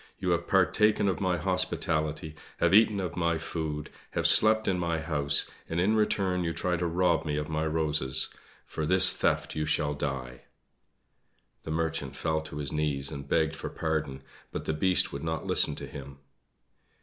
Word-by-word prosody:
You 90 Hz, -2 st, -1 dB
have 85 Hz, 0 st, 0 dB
partaken 100 Hz, +3 st, +3 dB
of 95 Hz, -1 st, -1 dB
my 90 Hz, -2 st, +1 dB
hospitality, 80 Hz, -5 st, -1 dB, 0.2 s
have 85 Hz, +1 st, +2 dB
eaten 105 Hz, -1 st, +5 dB
of 90 Hz, -3 st, -4 dB
my 85 Hz, -2 st, 0 dB
food, 80 Hz, -2 st, -5 dB, 0.3 s
have -, -, 0 dB
slept 110 Hz, 0 st, +5 dB
in 90 Hz, -2 st, +1 dB
my 85 Hz, -2 st, -1 dB
house, 75 Hz, -3 st, +1 dB, 0.2 s
and 80 Hz, -, -1 dB
in 100 Hz, +5 st, +2 dB
return 95 Hz, -4 st, +1 dB
you 85 Hz, -1 st, -2 dB
try 90 Hz, +1 st, -1 dB
to 90 Hz, 0 st, -1 dB
rob 85 Hz, 0 st, +1 dB
me 75 Hz, -2 st, -2 dB
of 75 Hz, 0 st, -3 dB
my 80 Hz, 0 st, -1 dB
roses. 75 Hz, -4 st, +1 dB, 0.3 s
For 75 Hz, -, -4 dB
this 90 Hz, +1 st, +6 dB
theft -, -, 0 dB
you 75 Hz, 0 st, -2 dB
shall 75 Hz, -1 st, +1 dB
die!" 65 Hz, -4 st, -5 dB, 1.2 s
The -, -, -10 dB
Merchant 80 Hz, -4 st, -2 dB
fell 80 Hz, +2 st, -1 dB
on -, -, -8 dB
his 70 Hz, -2 st, -3 dB
knees 70 Hz, -3 st, -1 dB
and 70 Hz, 0 st, -8 dB
begged 80 Hz, -1 st, +1 dB
for -, -, -6 dB
pardon, 75 Hz, -4 st, -3 dB, 0.3 s
but -, -, -5 dB
the 80 Hz, -, -1 dB
Beast 90 Hz, +4 st, +2 dB
would 70 Hz, -, -6 dB
not 80 Hz, -1 st, -3 dB
listen -, -, +2 dB
to -, -, -7 dB
him. 70 Hz, 0 st, -10 dB
80 Hz, 180 wpm, -28 LUFS, 75-90 Hz, 1.2 s, this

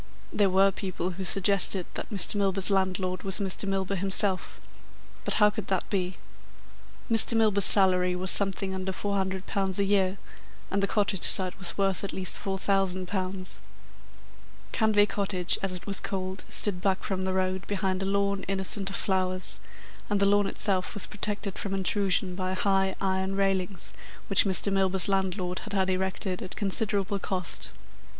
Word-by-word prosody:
There 205 Hz, -2 st, +2 dB
were 195 Hz, +1 st, +3 dB
people 185 Hz, -1 st, -4 dB
who 185 Hz, +2 st, -7 dB
suggested 195 Hz, 0 st, +4 dB
that -, -, -6 dB
Mr. 200 Hz, -4 st, +5 dB
Milburgh's 195 Hz, -1 st, +2 dB
landlord 185 Hz, -1 st, -1 dB
was 195 Hz, -1 st, +2 dB
Mr. 200 Hz, 0 st, -1 dB
Milburgh 195 Hz, 0 st, -2 dB
himself. 195 Hz, 0 st, +1 dB, 0.6 s
But -, -, +3 dB
how 210 Hz, -1 st, +4 dB
could 210 Hz, -2 st, -7 dB
that 190 Hz, -2 st, -2 dB
be? 185 Hz, -2 st, -2 dB, 0.9 s
Mr. 230 Hz, 0 st, +4 dB
Milburgh's 210 Hz, -3 st, +5 dB
salary 180 Hz, -2 st, +6 dB
was 185 Hz, +1 st, +3 dB
something 195 Hz, -1 st, +3 dB
under 190 Hz, 0 st, -3 dB
£400 190 Hz, -1 st, -3 dB
a 200 Hz, -, +1 dB
year, 195 Hz, -1 st, +1 dB, 0.5 s
and 200 Hz, -, 0 dB
the 200 Hz, -, 0 dB
cottage 200 Hz, -4 st, -1 dB
site 185 Hz, -1 st, +4 dB
was 180 Hz, -3 st, 0 dB
worth 195 Hz, -1 st, 0 dB
at 200 Hz, -, -4 dB
least 185 Hz, -1 st, -1 dB
£4,000. 190 Hz, -1 st, -2 dB, 1.3 s
Canvey 215 Hz, -3 st, +2 dB
Cottage, 190 Hz, -4 st, 0 dB
as 195 Hz, -2 st, -3 dB
it 180 Hz, -, -7 dB
was 195 Hz, -2 st, +1 dB
called, 190 Hz, 0 st, -5 dB
stood 190 Hz, -4 st, 0 dB
back 190 Hz, 0 st, -1 dB
from 190 Hz, -1 st, -3 dB
the 190 Hz, -, -2 dB
road, 185 Hz, 0 st, -2 dB
behind 190 Hz, -2 st, -2 dB
a -, -, -2 dB
lawn, 200 Hz, 0 st, -1 dB
innocent 195 Hz, +1 st, -1 dB
of 195 Hz, -, -6 dB
flowers, 185 Hz, -2 st, -2 dB, 0.5 s
and 205 Hz, -1 st, 0 dB
the 200 Hz, -, +3 dB
lawn 205 Hz, 0 st, +2 dB
itself 190 Hz, -3 st, -2 dB
was 205 Hz, -, -4 dB
protected 205 Hz, -1 st, -5 dB
from 195 Hz, -1 st, -4 dB
intrusion 195 Hz, -1 st, 0 dB
by 185 Hz, 0 st, -3 dB
high 195 Hz, 0 st, 0 dB
iron 190 Hz, 0 st, -2 dB
railings 195 Hz, -2 st, -2 dB, 0.4 s
which 195 Hz, -, +4 dB
Mr. 195 Hz, +1 st, 0 dB
Milburgh's 190 Hz, -2 st, +2 dB
landlord 185 Hz, -2 st, -2 dB
had 215 Hz, -, -9 dB
had 190 Hz, -1 st, 0 dB
erected 190 Hz, 0 st, -3 dB
at 185 Hz, -, -6 dB
considerable 200 Hz, 0 st, -1 dB
cost. 185 Hz, -2 st, -2 dB
195 Hz, 160 wpm, -26 LUFS, 185-200 Hz, 1.3 s, salary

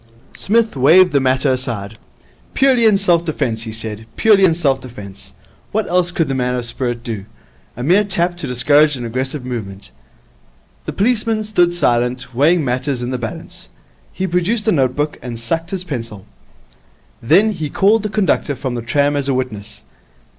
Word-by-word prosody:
Psmith 225 Hz, 0 st, +1 dB
waved 165 Hz, +7 st, +5 dB
the 140 Hz, -, +4 dB
matter 130 Hz, +1 st, +1 dB
aside. 110 Hz, -5 st, -4 dB, 0.6 s
'Purely 260 Hz, -4 st, +3 dB
in 215 Hz, -3 st, +5 dB
self 175 Hz, -4 st, +2 dB
defence,' 120 Hz, -9 st, -2 dB
he 115 Hz, -1 st, -5 dB
said, 110 Hz, 0 st, -6 dB
'purely 210 Hz, -3 st, +4 dB
in 165 Hz, -3 st, +3 dB
self 140 Hz, -5 st, 0 dB
defence. 100 Hz, -6 st, -11 dB, 0.4 s
What 215 Hz, 0 st, -1 dB
else 180 Hz, 0 st, +1 dB
could 165 Hz, -2 st, 0 dB
the 135 Hz, -, -2 dB
man 125 Hz, -1 st, -1 dB
of 125 Hz, -1 st, -2 dB
spirit 120 Hz, -1 st, -3 dB
do? 110 Hz, -5 st, -5 dB, 0.5 s
A 120 Hz, -, -4 dB
mere 185 Hz, +9 st, +4 dB
tap 175 Hz, -3 st, -1 dB
to 155 Hz, -, -5 dB
discourage 145 Hz, +4 st, +3 dB
an 120 Hz, -, -5 dB
aggressive 130 Hz, +3 st, -3 dB
movement.' 105 Hz, -6 st, -6 dB, 0.9 s
The -, -, -3 dB
policeman 220 Hz, 0 st, 0 dB
stood 175 Hz, -5 st, +1 dB
silent, 125 Hz, -4 st, 0 dB
weighing 155 Hz, +5 st, +3 dB
matters 130 Hz, 0 st, -2 dB
in 120 Hz, -, -3 dB
the 130 Hz, -, -3 dB
balance. 115 Hz, -2 st, -7 dB, 0.4 s
He 190 Hz, -, -3 dB
produced 190 Hz, +5 st, -1 dB
a -, -, +5 dB
notebook 145 Hz, 0 st, 0 dB
and 120 Hz, -2 st, -7 dB
sucked 165 Hz, +8 st, -3 dB
his 190 Hz, -1 st, -4 dB
pencil. 115 Hz, -, -6 dB, 1.0 s
Then 205 Hz, -, +4 dB
he 160 Hz, -7 st, -4 dB
called 210 Hz, +8 st, +3 dB
the 210 Hz, -, -3 dB
conductor 195 Hz, -8 st, 0 dB
of 130 Hz, -1 st, -4 dB
the 120 Hz, -, -3 dB
tram 145 Hz, +5 st, +1 dB
as 140 Hz, -1 st, -1 dB
a 135 Hz, -, +1 dB
witness. 115 Hz, -6 st, -5 dB
140 Hz, 175 wpm, -18 LUFS, 120-180 Hz, 1.0 s, waved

